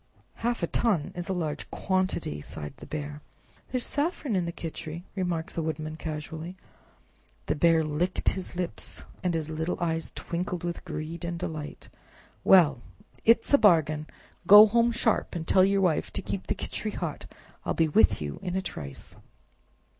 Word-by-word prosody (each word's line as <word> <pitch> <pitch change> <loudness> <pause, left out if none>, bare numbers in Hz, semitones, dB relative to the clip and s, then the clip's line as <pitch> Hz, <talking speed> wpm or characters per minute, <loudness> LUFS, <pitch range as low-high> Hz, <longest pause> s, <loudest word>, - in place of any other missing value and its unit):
"Half 235 -4 -1
a - - +5
ton 190 -9 +1
is 175 0 -5
a - - +1
large 160 -5 -3
quantity!" 185 - -1
sighed 75 0 -7
the - - -11
Bear. 150 -1 -5 0.5
"There 255 - +1
is 245 - -3
saffron 290 - -1
in 180 -2 +1
the 170 - -2
Khichri," 165 0 -6
remarked 175 -4 -2
the 165 - -2
Woodman, 155 0 -3
casually. 160 +3 -6 0.9
The - - +1
Bear 165 +1 +4
licked 155 +5 0
his 190 -1 -5
lips, 175 -1 -4 0.2
and 180 -2 +1
his 160 -2 -1
little 160 +3 -2
eyes 165 -2 -1
twinkled 175 0 -3
with 175 0 -3
greed 155 +2 -5
and 170 0 -3
delight. 160 -4 -6 0.6
"Well 155 -10 +6 0.4
it's 230 +4 +4
a 285 - +8
bargain! 155 -6 +4 0.4
Go 210 +3 +11
home 235 +2 +3
sharp 230 -4 +1
and 165 -2 -4
tell 185 - +5
your 195 +1 +3
Wife 175 -5 +1
to - - -3
keep 100 -1 -4
the - - 0
Khichri - - -4
hot; - - -4 0.4
I'll - - -1
be 165 - +3
with 155 - +4
you 70 -1 -5
in 180 - -3
a 190 - +1
trice." 70 - -7
170 Hz, 170 wpm, -28 LUFS, 155-190 Hz, 0.9 s, Go